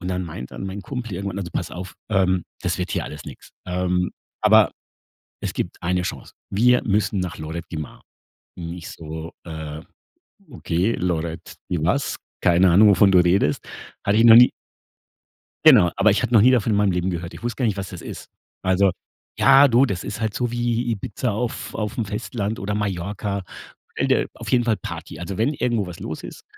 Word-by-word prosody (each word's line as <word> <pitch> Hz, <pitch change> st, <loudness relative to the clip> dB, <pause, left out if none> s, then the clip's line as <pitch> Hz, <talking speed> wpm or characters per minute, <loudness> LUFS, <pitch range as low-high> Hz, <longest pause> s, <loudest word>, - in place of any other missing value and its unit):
und 90 Hz, -, -5 dB
dann 90 Hz, 0 st, -1 dB
meint 75 Hz, -7 st, -7 dB
dann -, -, -7 dB
mein 95 Hz, +1 st, -6 dB
Kumpel 120 Hz, -4 st, -5 dB
irgendwann: 100 Hz, +1 st, -4 dB
„Also 90 Hz, -4 st, -5 dB
pass -, -, -3 dB
auf, 90 Hz, 0 st, -8 dB, 0.2 s
ähm, 95 Hz, -3 st, +2 dB, 0.2 s
das -, -, -1 dB
wird -, -, -3 dB
hier -, -, -1 dB
alles 75 Hz, +1 st, -8 dB
nix. 70 Hz, -, -11 dB, 0.2 s
Ähm, 90 Hz, 0 st, 0 dB, 0.3 s
aber -, -, +6 dB, 0.7 s
es -, -, -3 dB
gibt -, -, -3 dB
1. 90 Hz, +1 st, 0 dB
Chance. -, -, -6 dB, 0.2 s
Wir 125 Hz, +5 st, +4 dB
müssen 105 Hz, -2 st, +1 dB
nach 90 Hz, -2 st, -4 dB
Lloret 80 Hz, +2 st, -5 dB
de 80 Hz, -, -4 dB
Mar.“ 75 Hz, -, -8 dB, 0.5 s
Und 85 Hz, -1 st, -6 dB
ich 90 Hz, -, -8 dB
so: 80 Hz, +1 st, -8 dB
„Äh, 80 Hz, -2 st, -6 dB, 0.7 s
okay 100 Hz, -2 st, -1 dB
Lloret 85 Hz, -2 st, -3 dB
de 85 Hz, -4 st, -1 dB
was? 95 Hz, -, 0 dB, 0.3 s
Keine 90 Hz, +1 st, +4 dB
Ahnung, 105 Hz, +5 st, +7 dB
wovon 100 Hz, 0 st, +5 dB
du 90 Hz, -, +6 dB
redest. 90 Hz, -4 st, +2 dB, 0.4 s
Hatte 100 Hz, +2 st, +2 dB
ich 115 Hz, -, +5 dB
noch 115 Hz, -1 st, +9 dB
nie“ 125 Hz, +1 st, +8 dB, 1.1 s
Genau, 110 Hz, -, +7 dB
aber 100 Hz, +2 st, +5 dB
ich 105 Hz, -, +1 dB
hatte -, -, -1 dB
noch 110 Hz, -, +7 dB
nie 125 Hz, +4 st, +6 dB
davon 115 Hz, -3 st, +2 dB
in 105 Hz, -, +2 dB
meinem 100 Hz, -1 st, +3 dB
Leben 90 Hz, +1 st, -1 dB
gehört. 85 Hz, -1 st, -5 dB
Ich -, -, -11 dB
wusste 120 Hz, -1 st, -3 dB
gar -, -, +4 dB
nicht, 105 Hz, -3 st, 0 dB
was 95 Hz, -2 st, -4 dB
das -, -, -9 dB
ist. -, -, -9 dB, 0.3 s
Also, 95 Hz, +1 st, +3 dB, 0.5 s
ja 135 Hz, +2 st, +7 dB
du, 125 Hz, +2 st, +4 dB
das 95 Hz, -6 st, -3 dB
ist 105 Hz, -, -6 dB
halt 110 Hz, -2 st, -1 dB
so 120 Hz, +2 st, -2 dB
wie 120 Hz, 0 st, -1 dB
Ibiza 110 Hz, +2 st, -2 dB
auf 115 Hz, +3 st, -4 dB
auf 105 Hz, +3 st, -3 dB
'm 115 Hz, -, 0 dB
Festland 105 Hz, +1 st, -3 dB
oder 105 Hz, +1 st, -2 dB
Mallorca. 100 Hz, 0 st, -3 dB, 0.5 s
Stell -, -, -1 dB
dir -, -, +2 dB
auf -, -, -8 dB
jeden 125 Hz, -2 st, +4 dB
Fall 115 Hz, -3 st, +1 dB
Party. -, -, -8 dB
Also 90 Hz, +3 st, -5 dB
wenn 120 Hz, +7 st, +1 dB
irgendwo 120 Hz, -7 st, 0 dB
was 85 Hz, -, -9 dB
los 80 Hz, -, -6 dB
ist -, -, -10 dB
100 Hz, 205 wpm, -22 LUFS, 90-110 Hz, 1.1 s, noch